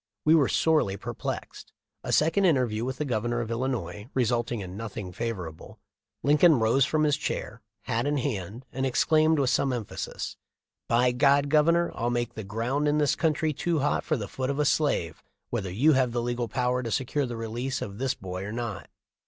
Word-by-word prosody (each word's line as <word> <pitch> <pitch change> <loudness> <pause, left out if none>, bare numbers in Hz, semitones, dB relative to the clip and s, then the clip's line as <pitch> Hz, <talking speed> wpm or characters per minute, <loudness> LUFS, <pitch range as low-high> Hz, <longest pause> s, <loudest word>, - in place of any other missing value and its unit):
We 155 - +6
were 150 -5 +5
sorely 150 -12 +2
perplexed. - - -6 0.3
A - - -3
second 165 +6 +3
interview 125 -9 +2
with 130 +1 -3
the 150 - -2
Governor 120 -1 -1
of 115 -1 -3
Illinois 115 -3 -3
resulting 120 -2 0
in 90 -1 -7
nothing 105 -3 -6
favorable 90 -7 -5 0.5
Lincoln 150 +2 +5
rose 120 +4 +3
from 155 -1 +1
his 150 -2 +3
chair, - - -4 0.2
hat 115 +4 -1
in 145 0 +1
hand, 115 -3 -3
and 130 - -2
ex 130 -2 +2
claimed 155 0 +4
with 135 -3 +2
some 135 - +2
emphasis: 120 -4 -5 0.5
"By 125 +2 +3
God, 140 +3 +3
Governor, 170 +3 +3
I'll 120 - -1
make 120 -1 -1
the 110 - -6
ground 120 +9 -1
in 145 +1 +2
this 145 -2 +2
country 155 -1 +1
too 165 +1 0
hot 145 - +1
for 155 - 0
the 105 -4 -4
foot 130 +4 -3
of 140 - -1
a 150 - +2
slave, 140 - +1 0.3
whether 100 -6 -2
you 140 - +4
have 130 -3 +2
the 120 -1 -1
legal 120 0 -2
power 125 +2 0
to 120 - -4
secure 135 +4 -1
the 120 -1 -5
release 120 +4 -3
of 100 +1 -6
this 130 0 0
boy 90 0 -6
or 105 - -5
not." 115 -4 -5
125 Hz, 195 wpm, -27 LUFS, 115-145 Hz, 0.5 s, We